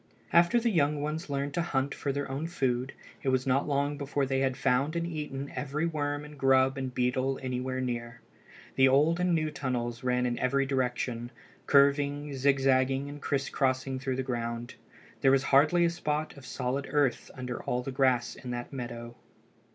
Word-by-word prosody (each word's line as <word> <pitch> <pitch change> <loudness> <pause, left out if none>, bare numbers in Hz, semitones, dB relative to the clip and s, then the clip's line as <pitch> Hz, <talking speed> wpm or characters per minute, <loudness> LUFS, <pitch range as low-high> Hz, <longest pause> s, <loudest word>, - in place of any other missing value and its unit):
After 170 +7 +5
the 235 0 +1
young 150 -4 +2
ones 150 +2 -3
learned 140 0 -2
to 170 - 0
hunt 140 -5 -1
for 140 - -2
their 140 +1 -2
own 140 +5 -3
food 130 -6 -1 0.3
it 135 - 0
was 130 -1 +1
not 135 +2 +1
long 145 0 0
before 140 0 -1
they 135 0 0
had 135 -1 0
found 140 +5 +1
and 170 0 0
eaten 150 -4 -5
every 150 +3 -2
worm 145 -2 -2
and 150 -1 -12
grub 135 0 +4
and 130 -1 -3
beetle 130 +2 0
anywhere 130 0 -2
near. 120 -2 -4 0.6
The 135 0 +7
old 150 +6 +4
and 180 -1 +2
new 155 -1 0
tunnels 125 -4 -3
ran 125 0 +1
in 120 -1 -1
every 135 +2 +2
direction, 125 -3 -1 0.4
curving, 140 +1 +3
zigzagging, 135 0 +2
and 145 0 -9
criss 140 -1 -1
crossing 130 -1 0
through 130 0 -2
the 130 - -2
ground. 120 -1 -3 0.5
There 135 - +5
was 135 0 +4
hardly 155 +6 +4
a 170 - +2
spot 155 -2 -2
of 140 -2 -12
solid 135 +2 -2
earth 145 -3 +1
under 125 -2 -5
all 125 -2 -2
the 135 - -4
grass 130 -2 +2
in 125 - -9
that 120 +2 -5
meadow. 120 -2 -6
135 Hz, 185 wpm, -29 LUFS, 130-145 Hz, 0.6 s, The